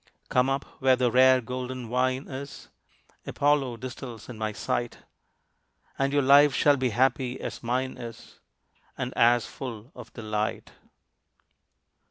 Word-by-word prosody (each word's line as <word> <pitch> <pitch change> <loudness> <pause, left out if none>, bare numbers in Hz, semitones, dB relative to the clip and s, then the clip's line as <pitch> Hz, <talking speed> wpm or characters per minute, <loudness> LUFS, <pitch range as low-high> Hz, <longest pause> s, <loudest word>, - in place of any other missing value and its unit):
Come 125 +1 +2
up 135 +1 -1 0.2
where 130 -1 +5
the 125 -1 +1
rare 130 +1 +6
golden 125 0 -5
wine 130 +2 0
is 140 +1 -8 0.6
Apollo 140 -4 +1
distills 125 -2 -8
in 125 - -7
my 110 0 -3
sight, 120 +2 -3 1.0
And 135 0 +1
your 145 -1 +2
life 140 +1 +6
shall 145 -1 +4
be 130 -2 0
happy 130 +2 0
as - - -6
mine 130 +2 -2
is, 115 -1 -10 0.6
And - - -4
as 120 0 +4
full 120 -1 -8
of 120 -3 -11
delight. 110 -1 -3
125 Hz, 135 wpm, -27 LUFS, 120-135 Hz, 1.0 s, rare